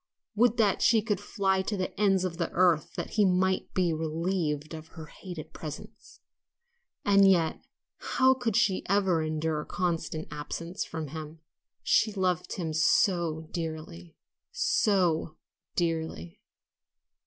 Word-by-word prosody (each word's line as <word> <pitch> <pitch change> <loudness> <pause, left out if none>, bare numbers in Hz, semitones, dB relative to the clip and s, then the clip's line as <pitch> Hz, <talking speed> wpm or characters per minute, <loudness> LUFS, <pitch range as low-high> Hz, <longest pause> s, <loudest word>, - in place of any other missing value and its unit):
would 230 +2 +3
that 210 -4 +2
she 230 - +5
could 210 -1 -1
fly 190 -2 0
to 205 +2 -3
the 185 - -3
ends 195 -3 +3
of 175 -3 -3
the 170 -2 -1
earth 170 -2 +2
that - - -4
he 215 - +3
might 190 0 +1
be 180 -3 +2
relieved 160 -1 -2
of 160 0 -8
her 160 -1 -10
hated 175 -1 -9
presence. 150 -2 -10 0.8
And 200 -1 +6
yet 170 -4 +2
oh, - - -34 0.5
how 260 0 +6
could 245 -5 -2
she 215 -4 +2
ever 190 -4 +2
endure 155 0 -1
constant 165 -3 -2
absence 165 +5 -5
from 160 -3 -6
him? 155 +1 -8 0.4
She 215 - +3
loved 185 -4 -1
him 165 -4 -3
so 160 0 +2
dearly, 155 - -6 0.4
so 175 -6 +1 0.4
dearly! 160 - -2
170 Hz, 135 wpm, -28 LUFS, 160-195 Hz, 0.8 s, And